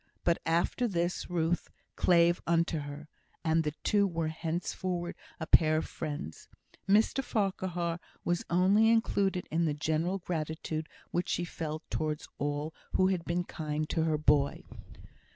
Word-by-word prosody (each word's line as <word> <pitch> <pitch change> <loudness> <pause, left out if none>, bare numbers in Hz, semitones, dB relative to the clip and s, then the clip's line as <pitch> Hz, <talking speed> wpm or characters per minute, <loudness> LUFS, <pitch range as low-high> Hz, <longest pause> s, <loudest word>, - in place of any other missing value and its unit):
But 170 -1 +2
after 170 +9 +2
this, 175 -3 -1
Ruth 170 0 0 0.3
"clave 170 -1 +4
unto 170 -1 +2
her," 145 +1 -7 0.4
and 160 0 +3
the 150 - 0
two 205 -1 +3
were 165 -3 -1
henceforward 175 +2 -3 0.2
a 160 - -3
pair 155 -1 +5
of 155 - -1
friends. 145 - -6 0.4
Mr 220 +6 +4
Farquhar 185 -6 -1 0.3
was 175 0 +1
only 195 +5 +5
included 200 -5 +2
in 165 +2 +2
the 150 -2 0
general 160 +5 0
gratitude 160 -2 -3 0.2
which 175 - -1
she 175 - 0
felt 160 -1 -5
towards 155 -1 -2
all 145 +2 -2 0.2
who 185 0 +4
had 180 -3 -1
been 175 +1 0
kind 155 -2 -3
to 165 - +1
her 155 -1 +2
boy. 145 -1 +2
170 Hz, 145 wpm, -31 LUFS, 155-180 Hz, 0.4 s, pair